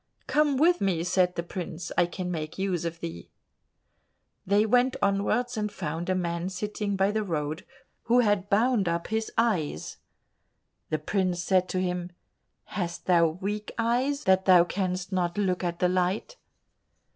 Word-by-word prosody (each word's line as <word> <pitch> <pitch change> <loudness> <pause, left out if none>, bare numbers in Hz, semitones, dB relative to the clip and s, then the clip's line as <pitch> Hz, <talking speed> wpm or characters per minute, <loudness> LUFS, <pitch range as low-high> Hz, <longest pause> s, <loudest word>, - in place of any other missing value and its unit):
"Come 295 -2 +2
with 345 +5 +4
me," 180 -4 +1
said 180 0 +2
the 170 - -2
prince, 175 -1 -6
"I 175 - +3
can 180 0 -4
make 155 -2 -4
use 185 -3 -1
of 170 0 -4
thee." 85 +1 -7 1.2
They 205 +2 +4
went 245 +3 +3
onwards 215 +5 0
and 210 -1 -1
found 170 -2 -4
a 185 - +2
man 170 0 -2
sitting 205 +2 -3
by 195 +1 +2
the 215 0 -1
road 155 -3 -3 0.4
who 245 +1 +4
had 205 -3 +1
bound 215 -2 +3
up 170 0 -2
his 220 0 -1
eyes. 180 - 0 0.9
The 155 - 0
prince 180 +2 -1
said 185 0 +2
to 185 - -1
him, 180 -1 -2 0.5
"Hast 175 -3 -5
thou 170 -2 +5
weak 200 +6 -4
eyes, 255 +5 0
that 190 0 +3
thou 180 -2 +7
canst 185 0 -3
not 175 -1 -1
look 185 -3 0
at 175 -1 -2
the 180 - +2
light?" 185 - -1
185 Hz, 160 wpm, -27 LUFS, 175-210 Hz, 1.2 s, thou